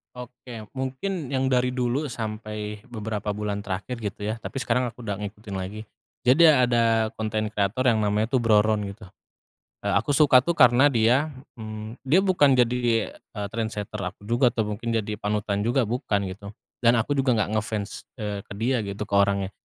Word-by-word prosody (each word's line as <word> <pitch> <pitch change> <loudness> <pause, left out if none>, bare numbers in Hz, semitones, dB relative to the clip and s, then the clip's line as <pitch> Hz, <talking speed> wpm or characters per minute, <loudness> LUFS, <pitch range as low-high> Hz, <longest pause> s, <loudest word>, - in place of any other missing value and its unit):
Oke, 120 -3 -10
mungkin 135 +4 -3
yang 130 0 +1
dari 125 -1 +2
dulu 125 +3 0
sampai 105 -4 -5
beberapa 105 -2 -4
bulan 105 0 -3
terakhir 100 +6 -4
gitu 105 -2 -5
ya, 110 - -2
tapi 130 +3 -6
sekarang 125 0 +1
aku 120 - -17
udah 105 -4 -3
ngikutin 105 0 -7
lagi. 105 +3 -6 0.3
Jadi, 130 +7 +5
ada 115 -4 +3
konten 110 -1 -1
kreator 105 +5 0
yang 110 -3 +3
namanya 105 +2 +1
tuh 130 - +1
Bro 115 -3 +4
Ron 105 -1 +1
gitu. 105 -1 -14 0.8
Eee, 100 - 0
aku 115 +8 +2
suka 140 -4 +7
tuh 170 +6 -2
karena 125 +3 +6
dia, 125 +4 +3 0.3
mmm, 110 +1 -7
dia 145 +8 +3
bukan 145 -8 +4
jadi, 120 -2 +1
eee, 105 -3 -8
trendsetter 110 -2 -4
aku 90 +2 -6
juga 120 +3 +3
atau 115 -2 -1
mungkin 115 +3 -5
jadi 105 -1 -3
panutan 105 -1 -1
juga 120 +4 +2
bukan 110 -3 -1
gitu. 100 +2 -7 0.3
Dan 120 0 +4
aku 115 +5 0
juga 135 -4 +2
enggak 105 0 0
nge-fans, 105 -1 -5
eee, 105 -3 -4
ke - - -11
dia 120 +2 +1
gitu, 100 0 -4
ke 100 - -5
orangnya. 100 -1 +1
110 Hz, 180 wpm, -25 LUFS, 105-125 Hz, 0.8 s, suka